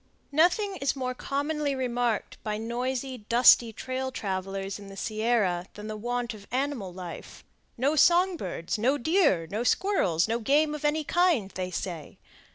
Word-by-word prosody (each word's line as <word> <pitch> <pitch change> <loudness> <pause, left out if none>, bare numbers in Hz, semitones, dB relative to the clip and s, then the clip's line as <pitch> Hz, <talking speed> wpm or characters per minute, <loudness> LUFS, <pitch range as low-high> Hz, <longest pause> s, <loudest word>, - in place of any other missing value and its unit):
Nothing 365 +6 +2
is 275 -3 0
more 255 -2 -2
commonly 285 +2 -2
remarked 245 -3 -2
by 210 -1 -2
noisy, 250 +3 -3
dusty 235 -1 +6
trail 260 +3 -4
travelers 195 -2 -4
in 200 - -11
the 195 0 -11
Sierra 215 -5 0
than 210 - -8
the 215 0 -5
want 240 +2 -3
of 205 -2 -13
animal 255 -7 -2
life—no 185 - -5
song 355 +4 +5
birds, 180 - -4
no 260 +6 +2
deer, 290 - +2
no 215 +3 -2
squirrels, 245 - +2
no 230 +1 0
game 295 +6 +2
of 300 - -6
any 300 +1 +1
kind, 325 - +2
they 185 -1 -4
say. 170 -3 -5
245 Hz, 155 wpm, -27 LUFS, 200-285 Hz, -, dusty